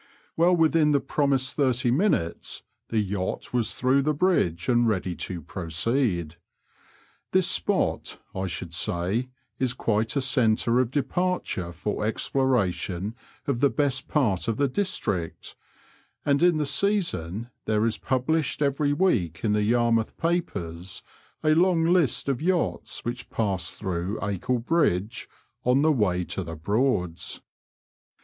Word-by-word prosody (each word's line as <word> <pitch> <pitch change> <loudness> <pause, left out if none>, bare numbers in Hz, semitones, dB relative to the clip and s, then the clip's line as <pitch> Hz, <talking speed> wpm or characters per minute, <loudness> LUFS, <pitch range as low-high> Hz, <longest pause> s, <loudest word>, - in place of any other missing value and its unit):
Well 175 +2 +4
within 160 -2 +3
the 140 - +4
promised 135 -3 0
thirty 130 -4 +2
minutes 130 - 0 0.3
the 115 - -1
yacht 100 -1 -2
was 120 -3 +1
through 130 +2 +3
the 150 +2 0
bridge 90 - +1
and 120 -1 +3
ready 95 -4 0
to 90 -4 -5
proceed. 85 - -1 1.0
This - - +4
spot, - - 0 0.2
I 95 0 -2
should 85 0 -4
say, 90 +9 0 0.3
is 125 -1 +1
quite 110 0 0
a 140 - +2
centre 120 -2 +3
of 130 -3 +2
departure 145 - -1
for 105 +5 -3
exploration 105 -5 0 0.3
of 135 -4 -1
the 140 - +4
best 135 -3 0
part 115 - +1
of 115 -1 0
the 140 - +2
district, 125 - -2 0.7
and 140 0 +2
in 175 -2 +4
the 150 - 0
season 120 - 0
there 110 0 +1
is 115 - -1
published 150 +3 0
every 145 +1 +1
week 110 - +1
in 105 -2 +2
the 105 - +2
Yarmouth 115 0 +1
papers 95 - -3 0.4
a 155 0 +4
long 170 0 +3
list 165 -9 +2
of 135 -1 -1
yachts 180 +1 -1
which 120 +1 -4
pass 95 -6 -1
through 95 0 -3
Acle 105 +5 -1
Bridge 115 - 0 0.2
*' 120 +4 -47
on 130 +3 +3
the 155 - +5
way 95 -9 +1
to - - -3
the 80 0 -6
Broads." 90 - -1
120 Hz, 140 wpm, -26 LUFS, 95-145 Hz, 1.0 s, the